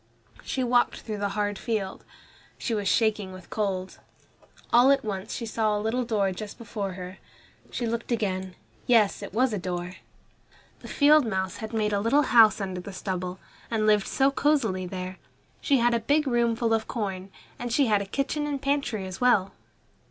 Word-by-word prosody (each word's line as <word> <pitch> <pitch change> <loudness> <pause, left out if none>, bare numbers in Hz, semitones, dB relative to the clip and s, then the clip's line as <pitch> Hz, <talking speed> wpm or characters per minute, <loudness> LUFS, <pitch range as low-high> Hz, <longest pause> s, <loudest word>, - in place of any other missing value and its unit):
She 260 - -2
walked 245 0 +2
through 215 -2 -5
the 200 0 -1
hard 205 -1 -1
field. 210 -5 -3 0.5
She 235 - -3
was 205 -2 -1
shaking 210 -4 +1
with 185 -1 -13
cold. 190 -3 -2 0.7
All 245 +3 +7
at 275 -4 +3
once 200 -1 -4
she 235 - -4
saw 215 -1 0
a - - -2
little 225 +4 0
door 210 -5 0
just 205 +2 -7
before 205 -4 -5
her. 180 0 -8 0.5
She 240 - -3
looked 230 +1 -3
again 190 -5 -2 0.3
yes, 220 -5 +4
it 200 - -7
was 245 +3 +1
a 205 - -1
door. 180 0 -4 0.8
The - - -11
field 300 +1 +5
mouse 190 -3 -2
had 220 -1 -6
made 215 -2 0
a 200 - +2
little 275 +7 +3
house 225 -5 +6
under 190 -2 -4
the 195 +2 -9
stubble, 185 -1 -4 0.3
and 220 -2 0
lived 210 -2 +3
so 270 0 +2
cosily 240 -11 +1
there. 185 0 -6 0.4
She 280 - +3
had 240 0 +3
a 235 - +2
big 290 +7 +2
room 235 -3 +2
full 230 -1 0
of 220 0 0
corn, 195 -4 -4 0.3
and 245 0 -4
she 275 +4 +3
had 210 -4 +2
a - - -4
kitchen 290 +6 -2
and 285 -2 -2
pantry 275 -7 -1
as 185 +3 -8
well. 220 -6 +3
215 Hz, 190 wpm, -26 LUFS, 190-240 Hz, 0.8 s, All